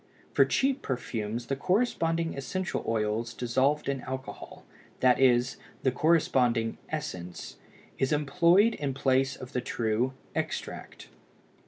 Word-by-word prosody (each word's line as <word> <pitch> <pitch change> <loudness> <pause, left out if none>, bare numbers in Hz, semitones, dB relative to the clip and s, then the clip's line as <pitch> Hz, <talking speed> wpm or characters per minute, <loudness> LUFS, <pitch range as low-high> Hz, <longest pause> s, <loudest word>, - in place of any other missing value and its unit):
For - - +6
cheap 270 +1 +1
perfumes 115 -3 -3
the 135 - -1
corresponding 165 - 0
essential 175 +7 -3
oils 110 +1 -1
dissolved 130 +5 +1
in 135 -2 -1
alcohol, 130 +1 -7 0.3
that 125 -1 +4
is, 125 -1 +3 0.3
the 130 - +3
corresponding 125 -6 +2
"essence," 90 - -5 0.4
is 135 - +1
employed 170 +9 +4
in 140 -3 -3
place 135 0 +2
of 130 -1 -10
the 125 - 0
true 115 +3 0 0.2
"extract." - - -5
130 Hz, 120 wpm, -29 LUFS, 120-155 Hz, 0.4 s, For